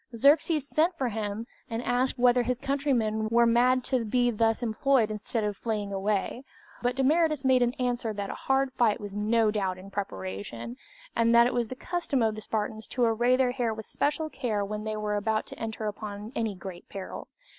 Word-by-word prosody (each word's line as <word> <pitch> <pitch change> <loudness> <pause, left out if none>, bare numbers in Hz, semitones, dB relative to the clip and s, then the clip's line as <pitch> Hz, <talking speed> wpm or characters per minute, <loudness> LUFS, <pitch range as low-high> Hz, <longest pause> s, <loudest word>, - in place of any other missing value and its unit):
Xerxes 290 +3 +4
sent 335 +4 +1
for 260 -4 0
him, 215 0 -3 0.2
and 230 +1 -3
asked 250 +2 +1
whether 245 0 +4
his 245 +1 -1
countrymen 245 -6 0
were 235 +1 +5
mad 245 +2 +4
to 255 -2 0
be 245 +2 +2
thus 225 +1 +1
employed 235 0 +2
instead 215 +2 -2
of 210 -1 -1
fleeing 210 -2 -3
away; 200 +4 -1 0.4
but 245 0 0
Demaratus 300 +1 +2
made 260 -1 +5 0.2
answer 245 -3 -1
that 200 -1 -4
a - - -4
hard 270 0 0
fight 235 -4 +2
was 205 -2 -7
no 215 +1 +2
doubt 190 -3 -1
in 190 +2 -11
preparation, 115 - -5 0.4
and 230 0 +3
that 235 0 +8
it 245 - 0
was 240 -2 0
the 255 - -6
custom 300 -4 -1
of 220 -1 +2
the 215 - -7
Spartans 215 0 -3
to 250 - -1
array 240 +2 +3
their 255 -1 +2
hair 240 -3 -1
with 220 -1 -7
especial 300 +2 -1
care 215 -5 -1
when 210 +1 -5
they 215 0 -2
were 210 -1 -1
about 215 +1 0
to - - -11
enter 220 -1 -4
upon 210 0 -5
any 225 -3 -1
great 180 -1 -9
peril. 195 -1 -7
225 Hz, 200 wpm, -28 LUFS, 210-255 Hz, 0.4 s, that